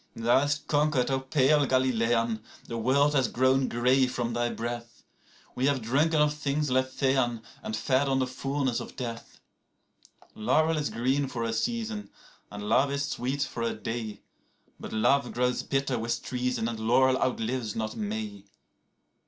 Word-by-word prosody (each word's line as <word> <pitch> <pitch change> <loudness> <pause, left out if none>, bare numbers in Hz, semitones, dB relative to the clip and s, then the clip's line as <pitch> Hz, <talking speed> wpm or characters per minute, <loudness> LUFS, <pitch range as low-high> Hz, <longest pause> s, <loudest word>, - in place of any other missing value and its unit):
35Thou 115 +3 +4
hast 145 +1 -1
conquered, 145 -3 +2
O 135 - +1
pale 140 +1 +3
Galilean; 115 -3 +1 0.2
the 115 - -6
world 135 +6 +3
has 135 -4 +3
grown 130 +1 +2
grey 125 +2 +3
from 120 -2 -2
thy 120 0 0
breath;36We 120 +2 -7
have 140 -4 +1
drunken 150 +7 +2
of 150 0 +3
things 150 -1 -1
Lethean, 130 -2 +1 0.2
and 110 - -4
fed 130 +5 +1
on 135 - +2
the 130 - +2
fullness 135 0 -2
of - - -8
death.37Laurel 125 +4 -4
is 145 - -1
green 135 +4 0
for 120 -3 -4
a 115 0 -1
season, 220 - -2 0.4
and 105 0 -7
love 135 +6 +3
is 140 0 -1
sweet 135 +2 -1
for 120 - -5
a 115 - -1
day;38But 115 -2 -8
love 135 +2 +3
grows 125 0 +1
bitter 135 -3 -1
with 115 +1 -2
treason, 125 -2 -1
and 115 -1 -4
laurel 130 +4 +3
outlives 120 -2 -1
not 110 -1 -3
May. 105 -2 -4
130 Hz, 150 wpm, -28 LUFS, 115-140 Hz, 0.4 s, 35Thou